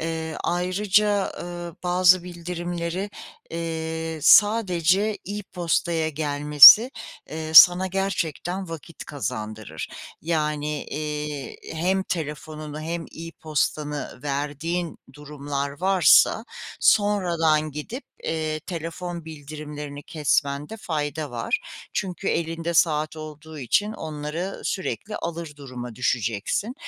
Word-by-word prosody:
Eee, 160 Hz, -1 st, -3 dB
ayrıca, 195 Hz, +3 st, +1 dB
eee, 175 Hz, -1 st, -6 dB
bazı 180 Hz, 0 st, +4 dB
bildirimleri, 175 Hz, +2 st, -4 dB, 0.4 s
eee, 160 Hz, -1 st, -4 dB
sadece 205 Hz, -1 st, +4 dB
e-postaya 175 Hz, -4 st, -1 dB
gelmesi, 150 Hz, -, +8 dB, 0.4 s
eee, 155 Hz, 0 st, -5 dB
sana 180 Hz, +3 st, +9 dB
gerçekten 185 Hz, -1 st, -2 dB
vakit 165 Hz, 0 st, -9 dB
kazandırır. 110 Hz, -, -5 dB, 0.3 s
Yani, 150 Hz, -2 st, -1 dB
eee, 150 Hz, -1 st, -5 dB, 0.2 s
hem 185 Hz, +4 st, +1 dB
telefonunu 155 Hz, -2 st, -5 dB
hem 165 Hz, +1 st, -3 dB, 0.2 s
e-postanı 150 Hz, -4 st, -3 dB
verdiğin 150 Hz, +4 st, -3 dB
durumlar 145 Hz, 0 st, -5 dB
varsa 190 Hz, +4 st, +5 dB, 0.4 s
sonradan 170 Hz, -7 st, +3 dB
gidip, 220 Hz, -, -7 dB, 0.2 s
eee, 155 Hz, -1 st, -2 dB
telefon 170 Hz, 0 st, -6 dB
bildirimlerini 150 Hz, -1 st, -8 dB
kesmende 150 Hz, +2 st, -1 dB
fayda 155 Hz, -, -3 dB
var. 120 Hz, -, -1 dB, 0.3 s
Çünkü 185 Hz, -3 st, -3 dB
elinde 165 Hz, 0 st, -2 dB
saat 155 Hz, -1 st, +2 dB
olduğu 155 Hz, 0 st, -9 dB
için 205 Hz, -, +1 dB
onları 155 Hz, +4 st, -4 dB
sürekli 205 Hz, +2 st, -3 dB
alır 170 Hz, -2 st, -5 dB
duruma 125 Hz, -4 st, -8 dB
düşeceksin. 120 Hz, -, -1 dB
160 Hz, 90 wpm, -24 LUFS, 150-180 Hz, 0.4 s, sana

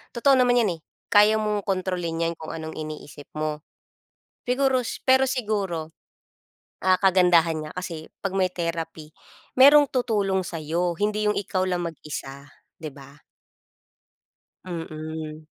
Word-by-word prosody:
totoo 275 Hz, +3 st, +4 dB
naman 245 Hz, -1 st, +4 dB
'yan, 185 Hz, -7 st, 0 dB
eh. -, -, -37 dB, 0.3 s
Kaya 210 Hz, +1 st, +6 dB
mong 210 Hz, -2 st, -1 dB
kontrolin 180 Hz, -3 st, -2 dB
'yan 170 Hz, -, -1 dB
kung 160 Hz, -, -7 dB
anong 160 Hz, 0 st, -7 dB
iniisip 155 Hz, -2 st, -8 dB
mo. 155 Hz, 0 st, -3 dB, 0.8 s
Siguro 255 Hz, 0 st, +1 dB
s -, -, -5 dB
pero 260 Hz, 0 st, +6 dB
siguro, 205 Hz, -, -2 dB, 0.9 s
ah, 185 Hz, 0 st, +4 dB
kagandahan 175 Hz, -4 st, +4 dB
niya -, -, -10 dB
kasi 165 Hz, -3 st, -6 dB, 0.2 s
'pag 195 Hz, -, -1 dB
may 185 Hz, -1 st, +2 dB
therapy, 165 Hz, -3 st, -5 dB, 0.4 s
merong 290 Hz, +3 st, +8 dB
tutulong 210 Hz, -6 st, +1 dB
sa'yo, 170 Hz, 0 st, -2 dB
hindi 210 Hz, +1 st, 0 dB
yung 210 Hz, -, 0 dB
ikaw 185 Hz, -1 st, -1 dB
lang 175 Hz, -1 st, -1 dB
mag-isa, 145 Hz, -3 st, -7 dB, 0.3 s
'di 155 Hz, -, -5 dB
ba? 140 Hz, +1 st, -15 dB, 1.4 s
Mm. 155 Hz, -2 st, -6 dB
175 Hz, 130 wpm, -25 LUFS, 160-210 Hz, 1.4 s, merong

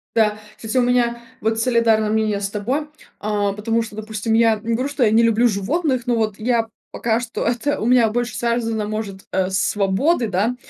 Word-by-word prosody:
Да, 215 Hz, -2 st, +3 dB, 0.2 s
кстати, 220 Hz, +1 st, -6 dB
у -, -, +5 dB
меня 240 Hz, -1 st, +1 dB, 0.2 s
вот 220 Hz, +1 st, 0 dB
солидарное 225 Hz, -3 st, +2 dB
мнение 215 Hz, -2 st, 0 dB
с 200 Hz, -, -2 dB
тобой. 250 Hz, +9 st, -2 dB, 0.3 s
А, 205 Hz, -1 st, -1 dB
потому 225 Hz, +3 st, 0 dB
что, 225 Hz, -2 st, -7 dB
допустим, 215 Hz, 0 st, -3 dB
я 225 Hz, -1 st, +4 dB
не 230 Hz, +1 st, -2 dB
говорю, 255 Hz, +5 st, -1 dB
что 285 Hz, -2 st, 0 dB
я 215 Hz, -, +4 dB
не 225 Hz, +2 st, +4 dB
люблю 230 Hz, +1 st, +4 dB
животных, 255 Hz, -, -1 dB
но 245 Hz, -1 st, +1 dB
вот 215 Hz, -2 st, -1 dB
я 230 Hz, 0 st, 0 dB, 0.2 s
пока 230 Hz, 0 st, 0 dB
что 240 Hz, -2 st, -4 dB
это 245 Hz, +5 st, 0 dB
у -, -, -2 dB
меня 240 Hz, -2 st, +4 dB
больше 240 Hz, +2 st, -2 dB
связано, 230 Hz, -2 st, -1 dB
может, 210 Hz, -2 st, -5 dB
э, 185 Hz, -1 st, 0 dB
с 190 Hz, -, 0 dB
свободой, 210 Hz, -, +1 dB
да, 210 Hz, +5 st, 0 dB
225 Hz, 200 wpm, -21 LUFS, 210-240 Hz, 0.3 s, у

